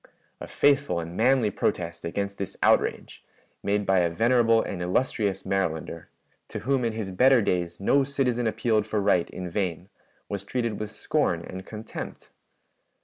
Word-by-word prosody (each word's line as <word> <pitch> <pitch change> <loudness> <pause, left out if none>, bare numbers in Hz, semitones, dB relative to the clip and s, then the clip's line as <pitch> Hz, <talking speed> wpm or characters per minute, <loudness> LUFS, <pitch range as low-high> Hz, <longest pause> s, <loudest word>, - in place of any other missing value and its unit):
"A - - -7
faithful 140 -9 +2
and 85 +1 -6
manly 120 -1 +3
protest 85 -2 -2
against 100 +3 -3
this 100 - -5
outrage, - - +1 0.4
made 100 0 0
by 95 -1 +3
a 85 -1 +2
venerable 115 +4 +3
and 95 -5 -3
illustrious 100 +2 0
Marylander, 85 -4 -2 0.4
to - - -5
whom 135 +1 +1
in 115 -1 0
his 110 -3 -4
better 130 +7 +5
days 90 -5 -1
no 135 +8 +3
citizen 130 -4 0
appealed 110 0 +1
for 110 - 0
right 100 -4 +2
in 90 0 -6
vain, 90 -1 -3 0.4
was 100 -1 -4
treated 115 0 -2
with 105 -1 -4
scorn - - -1
and 95 0 -8
contempt. 110 0 -8
105 Hz, 155 wpm, -26 LUFS, 90-115 Hz, 0.4 s, better